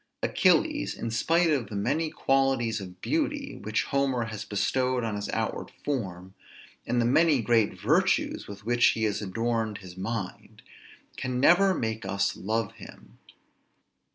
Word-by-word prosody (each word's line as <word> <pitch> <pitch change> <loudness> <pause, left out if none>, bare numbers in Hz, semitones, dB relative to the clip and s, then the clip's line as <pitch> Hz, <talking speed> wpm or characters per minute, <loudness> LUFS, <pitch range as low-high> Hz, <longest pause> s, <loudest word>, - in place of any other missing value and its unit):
Achilles, - - +2
in 115 - -4
spite 165 +8 +2
of 130 -7 0
the 105 - -6
many 155 +11 0
qualities 135 -7 +1
of 90 -1 -10
beauty 295 -3 -2
which 110 +1 0
Homer 135 -3 0
has 110 -2 -6
bestowed 125 +4 0
on 110 -2 -2
his 100 0 -4
outward - - -2 0.2
form, 95 -9 -3 0.5
and 120 - +1
the 120 - +2
many 150 +3 +4
great 115 -1 +2
virtues - - +1
with 100 0 -10
which 120 +1 +1
he 110 - -2
has 105 -1 0
adorned 110 +1 -1
his 90 -2 -11
mind, 95 0 -5 0.5
can 125 0 -2
never 185 +7 +5
make 110 -1 -2
us 100 +1 0
love 110 +2 -2
him. - - -14
115 Hz, 150 wpm, -27 LUFS, 105-135 Hz, 0.5 s, never